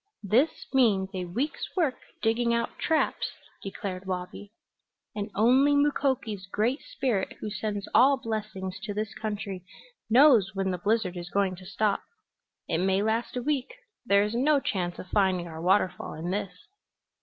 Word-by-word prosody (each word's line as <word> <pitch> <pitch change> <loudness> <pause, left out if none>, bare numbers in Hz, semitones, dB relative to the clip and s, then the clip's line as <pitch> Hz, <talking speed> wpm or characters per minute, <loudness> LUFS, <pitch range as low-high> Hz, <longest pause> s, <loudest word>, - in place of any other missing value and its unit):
"This 240 - +2
means 210 -8 +3
a 185 -1 -3
week's 240 - -3
work 320 -8 +1 0.2
digging 235 +1 +2
out 235 - -3
traps," 320 -1 +1 0.3
declared 195 -1 -6
Wabi. 185 +2 -5 0.6
"And 205 0 -3
only 260 +7 +5
Mukoki's 265 -9 0
Great 230 +8 0
Spirit, 255 - -2
who 210 - -5
sends 205 0 -3
all 270 +3 +6
blessings 210 -6 -4
to 205 0 -5
this 215 0 -3
country, 205 -4 -4 0.5
knows 235 -6 +6
when 195 -1 0
the 180 - -3
blizzard 205 -1 0
is 175 0 -6
going 195 -1 +1
to 185 0 -12
stop. 210 +1 0 0.7
It 165 - 0
may 190 +2 +2
last 225 +3 -1
a 245 - -2
week. 280 -2 -1 0.3
There 200 -4 +4
is 210 +1 -2
no 280 +5 +3
chance 180 -8 -2
of - - -8
finding 190 -4 +2
our 160 -1 -8
waterfall 185 +1 +1
in 165 +3 -4
this." 200 -1 -4
210 Hz, 155 wpm, -28 LUFS, 190-240 Hz, 0.7 s, all